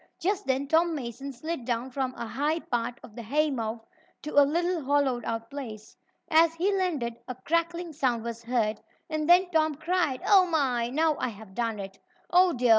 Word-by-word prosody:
Just 400 +3 -1
then 270 +1 0
Tom 325 +2 +3
Mason 270 +1 -5
slid 310 +2 -5
down 240 +1 -2
from 260 -1 -2
a - - -5
high 290 +7 0
part 240 -4 -3
of 215 - -13
the 235 - -6
haymow 240 -3 -1 0.4
to 300 - -5
a 285 - +6
little 340 +3 +1
hollowed 270 -3 +1
out 230 0 -4
place. 225 -7 -8 0.3
As 325 +1 +4
he 385 +4 +1
landed, 295 -12 -1
a 255 - -5
crackling 335 +4 -1
sound 250 -6 0
was 235 0 -5
heard, 230 -3 0 0.3
and 310 0 -1
then 355 +1 +6
Tom 315 -2 +2
cried: 315 -3 0
"Oh, 380 -3 +6
my! 260 -8 +1
Now 310 +3 +1
I 255 - 0
have 210 -3 -12
done 230 -1 -2
it! 195 -1 -8 0.3
Oh, 360 0 +6
dear! 245 -4 0
275 Hz, 190 wpm, -28 LUFS, 235-325 Hz, 0.4 s, a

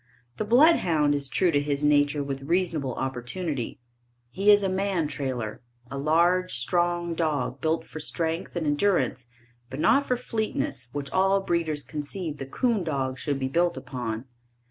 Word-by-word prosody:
The 215 - -2
bloodhound 205 - +4
is 140 -1 -1
true 180 +3 +2
to 145 - +3
his 145 0 -2
nature 145 0 +3
with 135 -1 -4
reasonable 160 -4 0
opportunity. 130 +2 -3 0.5
He 195 +2 +1
is 205 -1 +7
a - - +2
man 190 -4 0
trailer, 125 -8 -4 0.3
a 140 - -4
large, 170 +4 +2
strong 175 +6 0
dog, 145 -5 -1
built 160 +1 0
for 155 - -8
strength 165 +2 -3
and 170 -2 -1
endurance 145 -5 +1 0.4
but 130 +2 -6
not 280 - +4
for 250 - +1
fleetness 215 - -3
which 140 0 -5
all 195 +1 +3
breeders 165 -5 -1
concede 155 +1 -5
the 135 - -5
'coon 230 - 0
dog 135 -5 -2
should 145 -2 -1
be 130 -1 -1
built 170 +5 +1
upon. 125 -3 -5
155 Hz, 160 wpm, -26 LUFS, 140-180 Hz, 0.5 s, is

